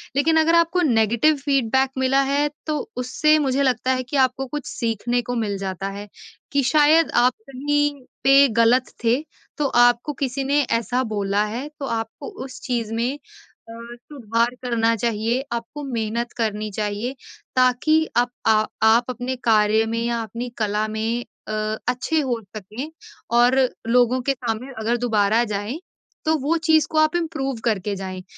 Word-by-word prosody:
लेकिन 320 +3 +3
अगर 330 +1 +3
आपको 335 +2 +3
नेगेटिव 235 - +3
फीडबैक 265 -1 +2
मिला 265 +1 +3
है 290 +1 +2 0.2
तो 305 -1 -1 0.2
उससे 305 +5 +2
मुझे 275 -1 +1
लगता 255 0 +1
है 255 0 -2
कि 275 +3 -3
आपको 260 0 +2
कुछ 295 0 -5
सीखने 235 +1 -1
को 245 +1 -4
मिल 210 -4 -1
जाता 195 0 -4
है 205 - -8 0.4
कि 280 -1 +2
शायद 310 +3 +4
आप 250 0 +4 0.2
कहीं 290 +2 0 0.3
पे 275 +1 +7
गलत 245 +3 +3
थे। 235 +4 +2 0.4
तो 295 -2 +1 0.2
आपको 245 +5 0
किसी 270 0 -1
ने 285 +2 +2
ऐसा 245 +1 0
बोला 200 0 +1
है 265 +5 -4
तो 275 - -3
आपको 225 +3 -4 0.2
उस 265 - -10
चीज़ 235 -4 -2
में 245 +5 -1 0.5
अ, - - -8 0.2
सुधार 235 -3 -1
करना 230 -2 +1
चाहिए, 230 +2 -1
आपको 235 +5 -5
मेहनत 235 -2 -3
करनी 215 -2 -1
चाहिए। 210 +5 -3 0.4
ताकि 255 +5 +3 0.2
आप 245 0 +3 0.2
आ 215 -1 +4 0.2
आप 225 +2 +5
अपने 255 +1 -3
कार्य 215 -1 +3
में 230 - -1
या 235 0 -1
अपनी 235 +3 -6
कला 215 0 0
में 225 +2 -2 0.2
अ, - - -5 0.4
अच्छे 260 +6 0
हो 255 -5 -1 0.2
सकें 215 +9 -7 0.5
और 245 +2 +5 0.3
लोगों 245 +1 +3
के 275 - +3
सामने 245 0 -4
अगर 230 +2 0
दोबारा 220 -1 +2
जाएँ 205 +9 -3 0.5
तो 315 0 +3
वो 295 +5 0
चीज़ 315 -2 +4
को 315 - -2
आप 310 +2 +3
इम्प्रूव 275 -7 -2
करके 205 -3 0
जाएँ। 185 -1 -6
245 Hz, 165 wpm, -22 LUFS, 225-275 Hz, 0.5 s, पे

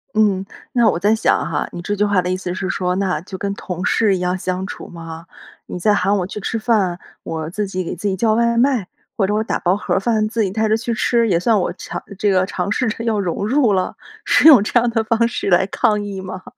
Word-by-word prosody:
嗯， 200 -3 +2 0.3
那 240 -3 +4
我 170 - -1
在 210 +3 +3
想 220 - +1
哈， - - -2
你 175 - -7
这 205 +3 -2
句 210 +1 +1
话 200 -3 +2
的 180 - -3
意 185 - 0
思 180 -1 -4
是 185 +1 -3
说， 180 -1 -1
那 185 -5 0
就 190 - -9
跟 200 +1 -3
同 180 -2 -5
事 210 -4 +2
一 185 - -3
样 180 +1 -1
相 185 +1 -3
处 - - -8
吗？ 165 -1 -9 0.4
你 180 - -6
在 210 +4 +3
喊 195 +2 +2
我 180 -3 -1
去 210 - -6
吃 225 +2 -3
饭， 200 -6 +1 0.2
我 160 -1 -4
自 210 +4 -2
己 185 -1 -3
给 170 - -5
自 205 +4 -3
己 190 - 0
叫 215 +2 +2
外 235 0 +2
卖， 240 -6 +2 0.3
或 195 - +2
者 205 - -1
我 215 +1 +1
打 - - -1
包 180 +1 +1
盒 205 - -1
饭， 215 0 +1
自 225 -1 0
己 190 - -1
带 220 +2 0
着 220 - +3
去 230 +1 -3
吃， 235 +1 +2
也 175 -5 +2
算 215 +3 +2
我 - - -1
强 - - -6 0.2
这 205 - +2
个 185 -1 +3
尝 200 0 -3
试 250 +2 0
着 230 +1 -5
要 220 -2 +1
融 195 +2 -2
入 250 -4 +3
了？ 185 -1 -1 0.3
是 - - +3
用 265 -10 +9
这 240 +3 +2
样 240 - 0
的 225 -1 0
方 230 +1 +2
式 225 - -3
来 180 +1 +4
抗 210 +2 +1
议 195 -2 -5
吗？ 185 0 -7
200 Hz, 280 characters per minute, -19 LUFS, 185-220 Hz, 0.4 s, 用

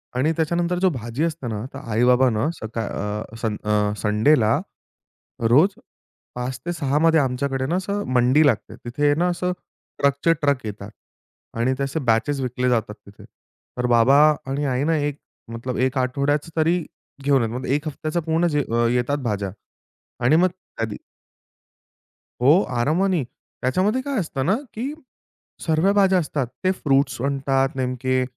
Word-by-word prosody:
आणि 140 +6 +2
त्याच्यानंतर 170 +2 0
जो 190 - +4
भाजी 125 0 -3
असते 160 -6 -2
ना, 110 0 -4
तर - - -7
आई-बाबा 125 +3 +4
ना 110 +6 0
सका 115 -5 -5
अ, 105 +2 -5
सन 110 -2 -1
अ, 105 0 +1
संडेला, 110 +2 +3 0.9
रोज 150 - +5 0.6
5-6 135 +4 -2
मध्ये 165 0 +4
आमच्याकडे 135 0 -1
ना, 170 +6 0
असं 200 +2 -2
मंडी 130 +5 +4
लागते. 120 -7 0
तिथे 145 +5 +1
ना 170 +4 +1
असं, 180 +1 -1 0.5
ट्रकचे-ट्रक 140 -2 +1
येतात. 105 -1 -7 0.7
आणि 120 +3 +1
त्या 140 - -1
असे 140 +4 -3
बॅचेस 135 +6 +1
विकले 125 0 -1
जातात 115 -3 0
तिथे. 100 - -15 0.5
तर 125 - +1
बाबा 120 +3 +5 0.3
आणि 140 +2 -1
आई 130 0 0
ना, 165 +1 +2
1 145 -1 -2 0.3
मतलब 120 +2 -4
1 130 +1 -2
आठवड्याचं 140 +5 0
तरी 165 +3 +3 0.5
घेऊन 140 -3 +3
येतात. 115 +1 -2
मग 130 - -6
एक 145 +4 0
हफ्त्याचा 155 +3 -3
पूर्ण 165 +1 +1
जे 150 -2 +1
अ, 120 0 +2
येतात 125 +4 0
भाज्या 100 -2 -2 0.8
आणि 150 +6 +5
मग 185 +2 +4 0.3
कधी 110 -2 -2 1.5
हो 150 +10 +6 0.2
आरामानी. 165 +5 +1 0.4
त्याच्यामध्ये 190 - +1
काय 275 -2 -2
असतं 145 -7 -3
ना, 195 +6 +3 0.2
की 260 +7 -4 0.7
सर्व 160 +4 +3
भाज्या 195 -2 +4
असतात. 150 -5 -2 0.2
ते 185 - +3
फ्रुट्स 135 -8 +1
आणतात 135 0 0
नेमके 130 0 0
135 Hz, 150 wpm, -22 LUFS, 120-160 Hz, 1.5 s, हो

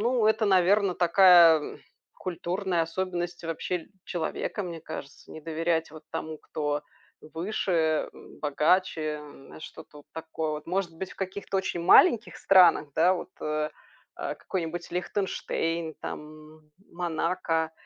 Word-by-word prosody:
ну 235 0 +2
это, 220 0 +3
наверно, 190 0 +3
такая, 175 -3 +7
м, - - -8 0.4
культурная 180 0 -2
особенность 175 0 -3
л - - -5
вообще 170 +1 -3 0.2
человека, 175 +4 -3
мне 170 -2 -6
кажется: 150 -3 -9
не 160 - -9
доверять 165 0 -1
вот 155 -1 -11
тому, 160 -1 -5
кто 145 -1 -3 0.5
выше, 165 -3 0 0.3
богаче, 155 +1 +1
м, 145 0 -13
что-то 150 - -11
вот 145 - -17
такое 160 -1 -4
вот. 150 - -6
Может 180 -1 -1
быть, 190 +2 -5
в - - -18
каких-то 195 0 -3
очень 180 -2 -2
маленьких 225 - +5
странах, 180 -6 +5
да, 175 +3 +4
вот, 180 - -6
э, 155 0 -1 0.5
а, - - -4
какой-нибудь: 170 -1 -4
Лихтенштейн 170 -3 -2
там, - - -5 0.4
М 150 -1 -29 0.2
Монако- 165 -1 -1
170 Hz, 135 wpm, -27 LUFS, 160-185 Hz, 0.5 s, такая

